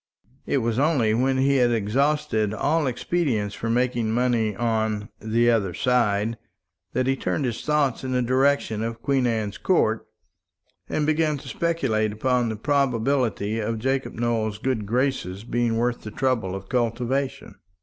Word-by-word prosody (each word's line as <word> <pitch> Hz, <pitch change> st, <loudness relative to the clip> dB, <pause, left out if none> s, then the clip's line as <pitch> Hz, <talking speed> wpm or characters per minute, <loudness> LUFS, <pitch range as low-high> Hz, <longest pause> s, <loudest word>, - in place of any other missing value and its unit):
It 135 Hz, -4 st, +1 dB
was 115 Hz, +1 st, 0 dB
only 135 Hz, -8 st, +2 dB
when 130 Hz, +3 st, +1 dB
he 135 Hz, +1 st, +3 dB
had 125 Hz, -2 st, +4 dB
exhausted 115 Hz, -1 st, +1 dB
all 150 Hz, +6 st, +1 dB
expedients 125 Hz, -6 st, -1 dB
for 115 Hz, -, -4 dB
making 120 Hz, -1 st, +1 dB
money 115 Hz, -3 st, +1 dB
on 110 Hz, -2 st, -1 dB
"the 115 Hz, +2 st, +2 dB
other 100 Hz, -6 st, 0 dB
side" 115 Hz, -3 st, +1 dB, 0.5 s
that 130 Hz, +1 st, +1 dB
he 135 Hz, +1 st, +2 dB
turned 140 Hz, +1 st, -1 dB
his 120 Hz, -2 st, -3 dB
thoughts 145 Hz, -5 st, +1 dB
in 130 Hz, -, -3 dB
the 125 Hz, -1 st, +1 dB
direction 130 Hz, -3 st, +1 dB
of 115 Hz, +1 st, -4 dB
Queen 135 Hz, -3 st, +2 dB
Anne's 110 Hz, -5 st, -2 dB
Court, -, -, +2 dB, 0.9 s
and 150 Hz, -, 0 dB
began 155 Hz, -1 st, +1 dB
to -, -, -11 dB
speculate 130 Hz, -11 st, 0 dB
upon 120 Hz, +2 st, 0 dB
the 110 Hz, -, -3 dB
probability 125 Hz, -4 st, 0 dB
of 110 Hz, +1 st, -2 dB
Jacob 135 Hz, +4 st, -1 dB
Nowell's 115 Hz, -3 st, -1 dB
good 110 Hz, -3 st, -2 dB
graces 115 Hz, -5 st, -1 dB
being 120 Hz, -1 st, 0 dB
worth 120 Hz, +1 st, 0 dB
the 110 Hz, -, -7 dB
trouble 115 Hz, -5 st, -1 dB
of 95 Hz, 0 st, -8 dB
cultivation. 125 Hz, +2 st, -2 dB
120 Hz, 155 wpm, -24 LUFS, 110-135 Hz, 0.9 s, had